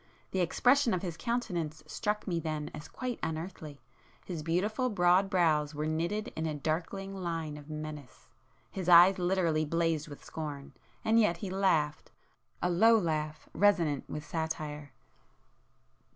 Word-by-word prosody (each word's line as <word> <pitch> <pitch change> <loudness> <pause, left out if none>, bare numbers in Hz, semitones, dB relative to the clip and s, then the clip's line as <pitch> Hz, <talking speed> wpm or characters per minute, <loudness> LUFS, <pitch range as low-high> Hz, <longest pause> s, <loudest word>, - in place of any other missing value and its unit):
The 190 - -1
expression 245 +7 +3
of 180 - -4
his 175 -3 -3
countenance 180 -10 -3
struck 210 0 -2
me 175 -4 -1
then 155 -2 -4
as 150 -1 -8
quite 250 -2 -5
unearthly,—his 155 -1 -7
beautiful 205 +10 0
broad 185 -1 +3
brows 155 -5 +2
were 150 +1 -2
knitted 170 +9 -1
in 160 0 -2
a 155 - -2
darkling 170 +6 -3
line 165 -5 -3
of 150 0 -11
menace,—his 155 - -8
eyes 180 +2 +8
literally 175 -4 +1
blazed 165 -1 0
with 145 -2 -11
scorn, 145 -3 -6 0.3
and 225 +1 +4
yet 210 -6 +3
he 185 +1 -5
laughed,—a 175 -2 -2
low 225 +6 +6
laugh, 155 -5 -2
resonant 175 -9 +2
with 150 0 -5
satire. 155 -3 -4
165 Hz, 135 wpm, -31 LUFS, 155-195 Hz, 0.3 s, eyes